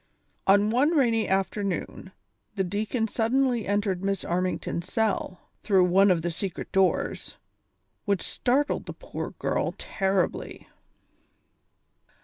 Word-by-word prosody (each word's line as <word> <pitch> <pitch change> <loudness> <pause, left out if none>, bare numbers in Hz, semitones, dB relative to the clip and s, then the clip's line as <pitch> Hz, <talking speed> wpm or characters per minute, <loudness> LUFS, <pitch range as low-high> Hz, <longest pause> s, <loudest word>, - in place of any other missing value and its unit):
On 205 +2 +5
one 290 +8 +3
rainy 230 -5 +2
afternoon 190 -1 -2 0.4
the 195 - +1
deacon 215 +5 -1
suddenly 240 +1 +1
entered 200 -2 0
Miss 195 -1 -1
Armington's 180 0 -2
cell, 215 -4 -1 0.2
through 195 -4 +4
one 190 +3 +5
of 170 -3 +2
the 175 - -1
secret 180 +2 -5
doors, 190 -1 0 0.7
which 200 -3 0
startled 275 +4 0
the - - -5
poor - - -6
girl - - -1
terribly. 195 -2 -2
200 Hz, 115 wpm, -26 LUFS, 185-225 Hz, 0.7 s, On